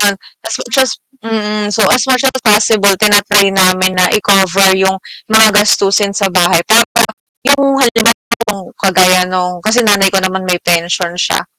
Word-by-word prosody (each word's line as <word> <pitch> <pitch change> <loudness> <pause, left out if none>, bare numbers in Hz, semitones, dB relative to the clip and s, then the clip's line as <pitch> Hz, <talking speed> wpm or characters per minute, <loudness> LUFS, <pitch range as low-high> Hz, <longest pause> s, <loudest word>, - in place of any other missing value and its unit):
Ah, 200 -1 +1 0.3
as 225 - -4
much 235 - -6
as 260 -3 +1 0.3
mm, 215 -2 -4
so 210 0 -1
as 250 - +2
much 260 +1 0
as 265 - +1
possible 210 -2 +2
tina-try 205 -1 +2
namin 185 -1 +1
na 185 -1 +1
i-cover 195 -2 +2
yung 190 0 0 0.3
mga 220 0 +4
gastusin 200 -1 +1
sa 195 -2 -2
bahay 175 -2 +1
para 235 +1 +2 0.4
yung 275 0 +1
halimbawa 230 -5 -1
kagaya 185 -1 +2
nung 180 -1 -4
kasi 225 +5 0
nanay 200 -2 +2
ko 195 - -3
naman 185 0 -4
may 180 - +1
pensyon 170 0 -1
siya, - - -2
200 Hz, 160 wpm, -11 LUFS, 185-220 Hz, 0.4 s, mga